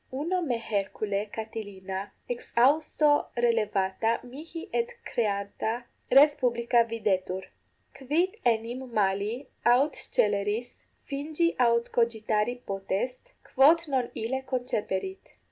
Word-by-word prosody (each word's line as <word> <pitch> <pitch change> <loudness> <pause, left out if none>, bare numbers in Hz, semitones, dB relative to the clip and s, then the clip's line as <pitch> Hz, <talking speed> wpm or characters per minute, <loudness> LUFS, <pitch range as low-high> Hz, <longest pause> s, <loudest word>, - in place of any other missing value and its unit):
Uno 330 +8 -1
me 260 -8 0
hercule 205 -1 -2
Catilina 205 -3 -6 0.2
exhausto 290 +5 +2
relevata 220 -2 +1
mihi 315 +7 -8
et 470 0 +1
recreata 220 - -2 0.3
res 285 +3 +7
publica 235 -2 +2
videtur. 195 -5 -1 0.5
Quid 325 - 0
enim 240 +2 0
mali 210 +4 0 0.2
aut 260 +5 +4
sceleris 210 +3 -1 0.2
fingi 310 +4 -1
aut 235 -1 +3
cogitari 230 0 0
potest, 200 - -3
quod 320 +5 +4
non 255 -3 0
ille 240 +4 -2
conceperit? 255 - -3
235 Hz, 95 wpm, -28 LUFS, 210-275 Hz, 0.5 s, res